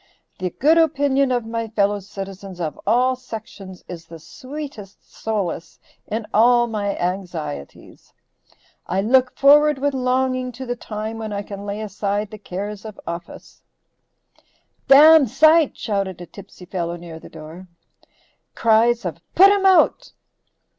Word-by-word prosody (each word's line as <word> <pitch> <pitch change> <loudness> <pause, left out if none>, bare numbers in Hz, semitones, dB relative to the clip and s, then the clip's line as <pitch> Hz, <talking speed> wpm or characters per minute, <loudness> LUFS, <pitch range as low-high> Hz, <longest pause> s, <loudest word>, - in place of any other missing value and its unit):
The 185 -1 -2
good 310 - +3
opinion 280 -4 +2
of 245 -2 -1
my 230 0 -4
fellow 205 -2 0
citizens 195 -1 -9
of 160 -3 -4
all 250 +4 +3
sections 200 -6 -10
is 170 -2 -9
the 165 - -10
sweetest 255 - -10
solace 190 -7 -4 0.3
in 220 +1 -3
all 240 +2 +5
my 205 -3 -3
anxieties. 175 - -6 0.8
I 190 +2 0
look 250 +4 +2
forward 295 +1 +5
with 285 +1 -1
longing 255 0 0
to 260 +3 -8
the 245 0 -3
time 220 -1 -6
when 220 -1 -5
I 200 0 -3
can 200 0 -8
lay 205 +1 -4
aside 205 0 -3
the 215 - -9
cares 200 +2 -6
of 215 -2 -10
office 170 0 -9 0.6
" - - -39
["dam 295 +1 +8
sight," 310 +5 +4
shouted 195 -4 -3
a 175 - -8
tipsy 190 -1 -14
fellow 175 -2 -4
near 170 -2 -10
the - - -13
door. 165 +4 -11 0.9
Cries 230 0 +3
of 170 -1 -4 0.2
"put 390 +3 +8
him 395 -1 +3
out." 375 -1 +3
215 Hz, 145 wpm, -21 LUFS, 190-255 Hz, 0.9 s, dam